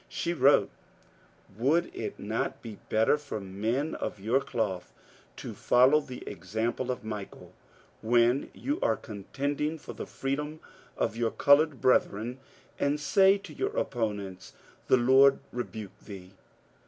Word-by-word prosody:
She 170 - -2
wrote: 140 -2 +4 0.5
— 180 - -28
Would 160 +8 +1
it - - -5
not - - -3
be 110 -3 -8
better 110 +7 +3
for 145 -7 -5
men 110 +10 -2
of 105 - -4
your 115 +7 +2
cloth 105 -9 -3 0.4
to - - -7
follow 130 +5 +4
the 130 -4 -9
example 110 +6 -3
of 125 -1 -3
Michael 105 -2 -7 0.5
when 120 +3 +3
you 290 +3 -2
are 110 - +2
contending 140 +9 -3
for 150 - -9
the - - -6
f - - -21
reedbm 150 +3 -2 0.4
of - - -1
your 115 -1 0
coloured 145 +3 +4
brethren, 125 0 +1 0.4
and 145 +1 +1
say 195 +6 +4
to 200 - -11
your 415 +4 -3
opponents, 100 - -3 0.2
" - - -29
The - - +5
Lord 130 +3 +6
rebuke 110 -4 -6
thee 95 -3 -11
125 Hz, 145 wpm, -29 LUFS, 110-145 Hz, 0.5 s, Lord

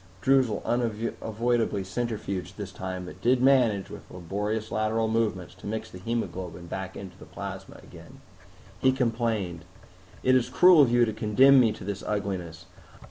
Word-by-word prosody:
Droozle 130 -6 +2
unavoidably 115 -1 -1
centrifuged 95 -3 -4
this 100 -3 -6
time, 95 0 -5
but 90 - -11
did 125 +1 +3
manage, 125 -7 +3
with - - -11
laborious 105 +5 -4
lateral 110 +1 0
movements, 110 -5 -1
to - - -11
mix 110 +1 -4
the 90 - -10
hemoglobin 95 -5 -4
back 95 +1 -6
with 95 -1 -9
the - - -11
plasma - - -8
again. - - -14 0.6
He 130 0 +3
complained, 115 -8 -1 0.6
"It 130 - +4
is 130 -2 +2
cruel 180 -3 +7
of 135 - +5
you 120 0 +5
to 110 - -3
condemn 130 +6 +5
me 115 -3 +4
to - - -11
this 100 +1 -4
ugliness. 90 -6 -4
110 Hz, 155 wpm, -27 LUFS, 95-120 Hz, 0.6 s, cruel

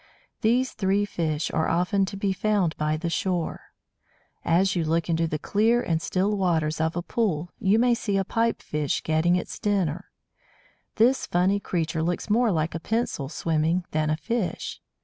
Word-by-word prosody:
These 245 +4 +2
three 200 +1 +1
fish 160 -5 -2
are 160 - 0
often 180 +4 +2
to 195 +1 -6
be 195 -1 0
found 190 -3 +1
by 155 0 0
the 170 +2 -3
shore. 175 0 -2 0.8
As 185 +4 +2
you 170 - +1
look 165 +2 0
into 165 0 +1
the 155 - -2
clear 220 +9 +2
and 165 -1 0
still 195 +5 0
waters 160 -5 0
of 160 0 0
a 175 - -2
pool 175 -7 -1
you 200 +2 +3
may 245 +1 +4
see 205 -4 -1
a 195 - 0
Pipe 230 +3 0
fish 150 -2 -2
getting 160 +2 +2
its 180 - -4
dinner. 190 -7 -1 0.9
This 245 +4 +3
funny 185 +3 +2
creature 165 -4 -2
looks 175 +5 -2
more 230 +1 +3
like 160 -2 0
a 165 - -3
pencil 215 - -2
swimming 165 +2 0
than 155 0 0
a 155 - +1
fish. 215 +4 -3
180 Hz, 175 wpm, -25 LUFS, 160-205 Hz, 0.9 s, may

